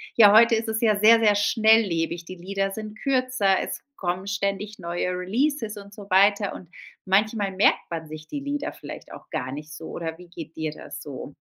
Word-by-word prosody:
ja, 210 -3 +8
heute 230 +2 +7
ist 225 0 -2
es 220 0 -1
ja 220 -2 +3
sehr, 220 +2 +6
sehr 210 -2 +4
schnelllebig. 205 -6 +2
Die 185 - -8
Lieder 195 +2 -3
sind 215 +1 -7
kürzer, 255 -8 +1
es - - -5 0.2
kommen 180 +1 -3
ständig 200 +1 -3
neue 175 0 -2
Releases 220 +6 -1
und 200 0 -11
so 200 -1 -12
weiter. 200 +1 +3
Und 175 - -11 0.4
manchmal 205 +1 +1
merkt 190 +2 +2
man 165 -2 -5
sich 155 0 -9
die 290 - -5
Lieder 285 +1 -3
vielleicht - - -10
auch - - -12
gar 130 0 -4
nicht 150 +2 -8
so. 160 +1 -9
Oder 165 -1 -5
wie 180 0 -15
geht 165 -2 -10
dir 160 -1 -3
das - - -9
so? 140 0 -8
200 Hz, 200 wpm, -24 LUFS, 175-220 Hz, 0.4 s, ja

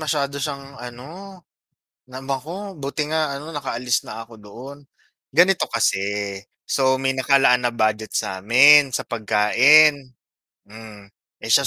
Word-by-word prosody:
masyado 140 -2 -3
siyang, 140 -1 -6
ano, 165 +11 -11 0.6
namako. 140 +10 -7
Buti 145 +1 -4
nga, 155 -2 -1
ano, 150 - -11
nakaalis 125 -4 -3
na 115 +1 -9
ako 115 - -16
doon. 115 +7 -12 0.6
Ganito 180 +5 +3
kasi, 100 -3 -2 0.3
so 130 -1 +1
may 135 0 -1
nakalaan 130 -2 +2
na 120 - 0
budget 110 -2 -2
sa 95 0 -4
'min, 135 +4 +6
sa - - -3
pagkain, 130 +6 +3 0.5
hmm. 105 -1 -14 0.4
Eh, - - -6
siya - - +4
130 Hz, 130 wpm, -21 LUFS, 115-145 Hz, 0.6 s, min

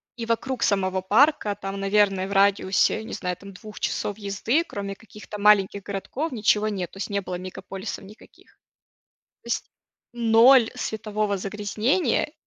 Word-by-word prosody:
И 235 -2 -5
вокруг 235 +2 -1
самого 190 -2 +1
парка 215 +1 +3
там, 195 0 -6
наверное 195 -1 +2
в - - -8
радиусе, 200 +1 +3
не - - -8
знаю, 180 -1 -3
там 200 0 -12
2 210 +3 -11
часов 205 - -2
езды, 220 +9 0
кроме 200 -8 -5
каких-то 210 0 -11
маленьких 200 -1 +4
городков 205 +11 -4
ничего 215 -2 +2
нет, 190 -5 -3
то - - -14
есть 195 - -4
не 200 -1 -1
было 185 -1 -5
мегаполисов 185 +2 -7
никаких. 205 +3 -17 0.9
То - - -23
есть - - -3 0.4
ноль 235 +1 +5
светового 215 -2 -2
загрязнения, 210 - 0
205 Hz, 150 wpm, -24 LUFS, 195-220 Hz, 0.9 s, ноль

